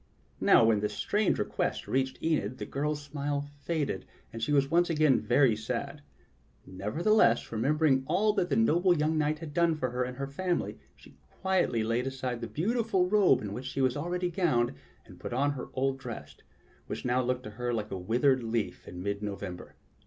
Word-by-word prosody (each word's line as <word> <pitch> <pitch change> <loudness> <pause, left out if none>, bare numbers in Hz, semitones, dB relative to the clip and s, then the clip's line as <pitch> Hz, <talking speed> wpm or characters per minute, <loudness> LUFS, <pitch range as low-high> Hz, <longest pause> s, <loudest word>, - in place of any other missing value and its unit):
Now - - +6
when 110 -2 +3
this 105 0 -2
strange 210 -1 +1
request - - -2
reached 130 0 0
Enid, 130 -8 0
the - - -5
girl's 145 +1 -2
smile 145 0 -3
faded, 155 -1 -2 0.3
and 115 - -6
she 115 - -1
was 140 -1 +2
once 175 +1 +3
again 155 -4 +3
very 125 -2 +3
sad; 125 +6 -4 0.6
nevertheless, 115 - +2
remembering 135 +4 +2
all 205 +6 +2
that 185 -4 0
the - - +1
noble 180 -5 +3
young 155 +2 +1
knight 150 0 +1
had 155 -2 -8
done 170 0 +3
for 130 -5 -2
her 125 +1 -1
and 125 0 -5
her 140 - -2
family, 175 +6 -2 0.2
she - - -19
quietly 185 -12 0
laid 115 +3 0
aside 130 -2 -4
the 115 - -3
beautiful 210 +1 0
robe 200 - +4
in 100 -1 -4
which 125 +5 -6
she 135 - -4
was 130 -2 +2
already 175 +4 -2
govmed 155 - +1 0.3
and - - -15
put - - -6
on 140 +3 +2
her 135 -3 -6
old 135 0 0
dress, 125 -3 -8 0.5
which - - -5
now 125 +1 +2
looked 125 0 -1
to 110 - -8
her 120 +3 -3
like 110 -3 -3
a - - -2
withered 125 +7 +2
leaf 115 -1 -3
in 90 0 -7
mid 100 0 -2
November. 100 -3 -6
135 Hz, 190 wpm, -29 LUFS, 120-165 Hz, 0.6 s, Now